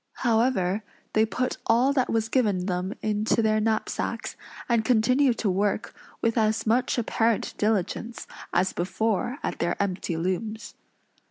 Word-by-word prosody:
However, 220 Hz, -4 st, +2 dB, 0.3 s
they 220 Hz, +1 st, +3 dB
put 250 Hz, +3 st, -2 dB
all 250 Hz, +4 st, +4 dB
that 260 Hz, -3 st, +1 dB
was 225 Hz, -1 st, +1 dB
given 210 Hz, -7 st, +1 dB
them 180 Hz, 0 st, -2 dB
into 215 Hz, +2 st, +1 dB
their 215 Hz, 0 st, +3 dB
knapsacks; 220 Hz, 0 st, -2 dB, 0.3 s
and 235 Hz, -2 st, +2 dB
continued 250 Hz, +2 st, +3 dB
to 210 Hz, -, 0 dB
work 200 Hz, +3 st, 0 dB, 0.3 s
with 230 Hz, +1 st, +2 dB
as 215 Hz, 0 st, +1 dB
much 245 Hz, +4 st, +2 dB
apparent 230 Hz, -1 st, +1 dB
diligence 220 Hz, +2 st, -1 dB, 0.3 s
as 185 Hz, +2 st, +1 dB
before 220 Hz, +7 st, -1 dB
at -, -, -3 dB
their 170 Hz, -, -1 dB
empty 185 Hz, -3 st, -1 dB
looms. 200 Hz, +6 st, -3 dB
220 Hz, 140 wpm, -26 LUFS, 200-230 Hz, 0.3 s, all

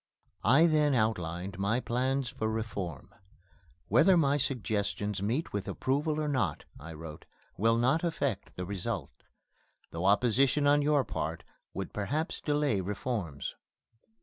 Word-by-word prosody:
I 135 Hz, +10 st, +6 dB
then 150 Hz, -4 st, +3 dB
outlined 95 Hz, -4 st, -1 dB
my 105 Hz, +5 st, +1 dB
plans 130 Hz, +2 st, 0 dB
for 125 Hz, -4 st, -3 dB
reform: 100 Hz, -, -4 dB, 0.7 s
"Whether 170 Hz, -, +5 dB
my 145 Hz, -3 st, +3 dB
suggestions 105 Hz, -6 st, -1 dB
meet 120 Hz, +11 st, -1 dB
with 100 Hz, -2 st, -3 dB
approval 150 Hz, +3 st, 0 dB
or 155 Hz, -, -1 dB
not," 135 Hz, -3 st, -1 dB
I 80 Hz, +3 st, -9 dB
wrote, 75 Hz, -1 st, -9 dB, 0.3 s
"will 115 Hz, +3 st, +3 dB
not 130 Hz, +8 st, +2 dB
affect 140 Hz, -, -2 dB
the 90 Hz, -, -4 dB
result 95 Hz, -1 st, -3 dB, 0.8 s
though 85 Hz, +2 st, -3 dB
opposition 125 Hz, +7 st, +3 dB
on 145 Hz, +1 st, +5 dB
your 145 Hz, -1 st, +3 dB
part -, -, -4 dB, 0.3 s
would -, -, -4 dB
perhaps 145 Hz, -, -2 dB
delay 145 Hz, -9 st, +1 dB
reforms. 100 Hz, -, -3 dB
120 Hz, 130 wpm, -30 LUFS, 100-145 Hz, 0.8 s, I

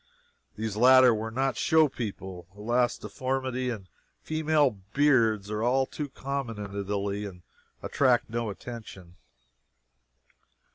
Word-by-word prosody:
These 110 Hz, -1 st, -3 dB
latter 130 Hz, +2 st, +7 dB
were 110 Hz, +1 st, -3 dB
not 135 Hz, +4 st, -1 dB
show 160 Hz, -2 st, +4 dB
people. 95 Hz, -, -6 dB
Alas, 120 Hz, +3 st, +1 dB
deformity 130 Hz, -1 st, -2 dB
and 105 Hz, -6 st, -5 dB, 0.4 s
female 155 Hz, -3 st, +2 dB, 0.2 s
beards 115 Hz, -8 st, +3 dB
are 120 Hz, +5 st, +1 dB
too 150 Hz, -2 st, -4 dB
common 135 Hz, -4 st, -4 dB
in 100 Hz, -1 st, -7 dB
Italy 100 Hz, 0 st, -2 dB
to 90 Hz, -3 st, -10 dB, 0.4 s
attract 125 Hz, -4 st, +2 dB
attention. 110 Hz, -5 st, -6 dB
120 Hz, 105 wpm, -28 LUFS, 105-130 Hz, 0.4 s, latter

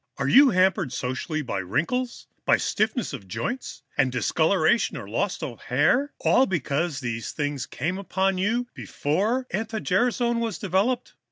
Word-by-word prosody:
Are 135 Hz, -, -1 dB
you 275 Hz, -, +7 dB
hampered 185 Hz, -, +2 dB
socially 130 Hz, +6 st, -3 dB
by 100 Hz, -7 st, -3 dB
wrinkles, 205 Hz, -, -2 dB, 0.2 s
by -, -, +4 dB
stiffness 215 Hz, -, -1 dB
of 105 Hz, -8 st, -7 dB
joints 245 Hz, -, -4 dB
and -, -, +2 dB
discoloration -, -, +2 dB
or -, -, -7 dB
loss -, -, -2 dB
of -, -, -6 dB
hair, 280 Hz, +3 st, +2 dB
all 265 Hz, -, +3 dB
because 155 Hz, -4 st, -1 dB
these 115 Hz, -2 st, -3 dB
things 145 Hz, -3 st, -3 dB
came 165 Hz, +9 st, -3 dB
upon 190 Hz, -1 st, 0 dB
you 230 Hz, +6 st, +1 dB
before 210 Hz, -, -1 dB
anti 220 Hz, +2 st, -2 dB
gerasone 235 Hz, +4 st, +1 dB
was 230 Hz, -2 st, -2 dB
developed? 205 Hz, +6 st, 0 dB
190 Hz, 150 wpm, -25 LUFS, 145-235 Hz, 0.2 s, you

